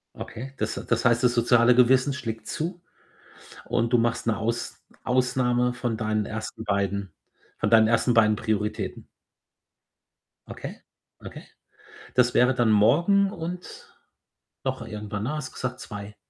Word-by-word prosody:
Okay, 135 +4 -8
das - - -2
h - - -5
das 115 +1 0
heißt, 115 +1 +3
das 120 -1 +4
soziale 120 0 +4
Gewissen 130 +3 +4
schlägt 115 -4 -5
zu 175 +3 -4 0.9
und 115 0 0
du 120 - +5
machst 115 0 0
'ne 115 - +1
Aus 115 +1 -3 0.2
Ausnahme 125 -1 +1
von 120 -2 -3
deinen 110 -1 0
1. 110 +1 -6
beiden 100 -2 -1 0.5
von - - 0
deinen 110 -1 +6
1. 120 +1 +2
beiden 110 -2 +4
Prioritäten? 105 -1 -3 1.4
Okay, - - -8 0.4
okay. - - -9 0.7
Das 125 -1 +3
wäre 125 +1 +4
dann 120 -3 +2
morgen 175 - +4
und 175 +1 -7 0.8
noch - - -2
irgendwann, 105 -1 -5
ne, 150 +5 -2
hast 150 - -4
du - - -19
gesagt, 125 -1 -4
2. 105 -1 -8
120 Hz, 145 wpm, -25 LUFS, 110-125 Hz, 1.4 s, deinen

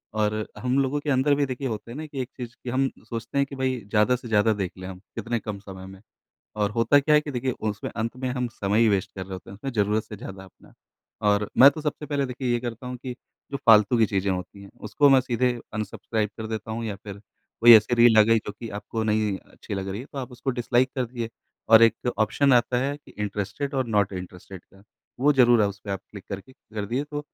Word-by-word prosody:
और 105 0 +1 0.2
हम 125 +4 0
लोगों 135 +2 +1
के 145 - -4
अंदर 140 +2 +3
भी 145 0 +1
देखिए 130 +1 -4
होता 115 0 -5
है 130 - -7
न 155 - -5
कि 140 -3 -4
एक 125 - -5
चीज़ 120 -1 -6
कि 125 - -5
हम 135 +1 +1 0.2
सोचते 115 +3 -5
हैं 140 - +3
कि 140 - -8
भई 130 -1 -1
ज़्यादा 105 +3 +3
से 125 -1 -8
ज़्यादा 110 0 +3
देख 95 -3 -3
लें 95 0 -7
हम 95 -1 -8 0.2
कितने 120 0 -2
कम 105 -2 -6
समय 95 -2 -10
में। 95 0 -12 0.6
और 105 -1 +1
होता 115 +6 +4
क्या 150 +2 +3
है 150 - +6
कि 150 - -6
देखिए 130 0 -1 0.2
उसमें 105 0 -4
अंत 115 +2 -4
में 130 0 -3
हम 125 -1 -2
समय 105 -1 -1
ही 115 - +5
वेस्ट 100 -1 0
कर 95 - -4
रहे 95 - -9
होते 95 0 -8
हैं - - -9
उसमें, 135 +7 -5
ज़रूरत 105 0 +1
से 105 -1 -9
ज़्यादा 95 0 -9
अपना। 95 - -19 0.6
और 105 0 +2
मैं 140 +2 +10
तो 155 - -7
सबसे 150 0 -3
पहले 140 -1 -1
देखिए 125 0 -4
ये 120 - +1
करता 120 0 -6
हूँ 125 0 -5
कि 125 0 -6 0.4
जो - - 0
फ़ालतू 110 +1 +6
की 110 - +5
चीज़ें 100 0 -1
होती 95 +2 -5
हैं 100 - -13 0.2
उसको 140 +7 +4
मैं 135 -1 +7
सीधे 125 0 0 0.2
अनसब्सक्राइब 110 0 -2
कर 110 - -4
देता 110 0 -5
हूँ 115 +1 -3
या 105 -3 -4
फिर 100 -1 -8 0.4
कोई 120 0 +10
ऐसी 110 +3 +5
रील 120 -2 +6
आ - - +10
गई 115 +1 +4
जो 105 - -4
कि 115 +2 -8
आपको 110 +1 -4
नहीं 105 -2 +1 0.2
अच्छी - - -7
लग 95 0 -4
रही 100 +4 -4
है 135 - -9
तो 140 - -6
आप 125 -1 -6
उसको 125 +2 -3
डिसलाइक 125 +1 +1
कर 130 -2 0
दिए। 115 -1 -5 0.4
और 110 0 +8
एक 115 +2 +3
ऑप्शन 135 +5 +3
आता 125 0 +3
है 140 +3 -1
कि 145 - -19
इंटरेस्टेड 105 +7 -3
ओर 130 -2 0
नॉट 105 -3 +1
इंटरेस्टेड 90 0 -8
का, 95 0 -21 0.4
वो 145 +2 +5
ज़रूर 120 -4 +5
है - - +4
उसपे 100 0 -8
आप 95 -1 -2
क्लिक 100 -3 -10
करके 100 +6 -7
कर 110 -6 -7
दिए 130 +7 -1
तो 145 0 -5
115 Hz, 255 wpm, -25 LUFS, 105-130 Hz, 0.6 s, मैं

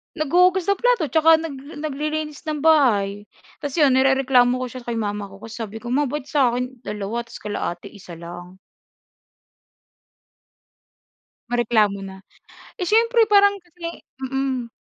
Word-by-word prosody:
Naghuhugas 360 +5 +3
ng 400 - +1
plato, 475 - +1
tsaka 320 +3 +5
nag 290 0 -8
naglilinis 305 +1 -4
ng 305 -2 -3
bahay. 210 -10 +3 0.3
Tas 285 -2 -5
'yon 295 -5 +4
nirereklamo 260 -2 +3
ko - - -2
siya 250 0 -10
kay 235 - -2
mama 205 -2 -3
ko 195 0 -15
kasi 225 +1 -9
sabi 220 0 -6
ko, 240 - -6
"Ma 285 +3 +2
ba't 285 +1 -5
sa'kin 250 -2 0
2, 210 +3 -4
tapos 230 - -12
kila 205 0 -4
ate 185 +3 -13
1 185 -4 -12
lang?" 175 +2 -10 2.9
Mareklamo 220 -5 +2
na. 195 -1 -8 0.6
Eh, 365 - -2
siyempre 460 +2 +4
parang 405 0 +6
kasi 340 -1 -9 0.2
mm. 265 -2 -2
265 Hz, 140 wpm, -22 LUFS, 220-310 Hz, 2.9 s, parang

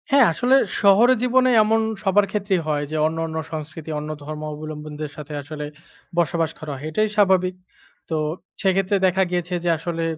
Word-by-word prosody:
হ্যাঁ, 275 -2 +6
আসলে 250 +10 +3 0.3
শহরে 215 +5 +6
জীবনে 255 +1 +4
এমন 220 +1 +2 0.2
সবার 200 0 +4
ক্ষেত্রেই 195 -3 0
হয় 150 -1 0
যে, - - -3
অন্য, 160 +1 -1
অন্য 160 0 -5
সংস্কৃতি 160 0 -7
অন্য 150 +1 -6
ধর্মাবলম্বীদের 150 0 -6
সাথে 150 0 -8
আসলে 150 +1 -6 0.5
বসবাস 165 -1 +1
করা 155 -1 -6
হয়। 135 +3 -8
এটাই 215 +7 +2
স্বাভাবিক। 185 -3 +3 0.5
তো 160 - -1 0.5
সেক্ষেত্রে 195 0 +2
দেখা 190 +1 +3
গিয়েছে 180 0 -2
যে, 175 - +1
আসলে 165 +1 -3
170 Hz, 160 wpm, -22 LUFS, 155-200 Hz, 0.5 s, হ্যাঁ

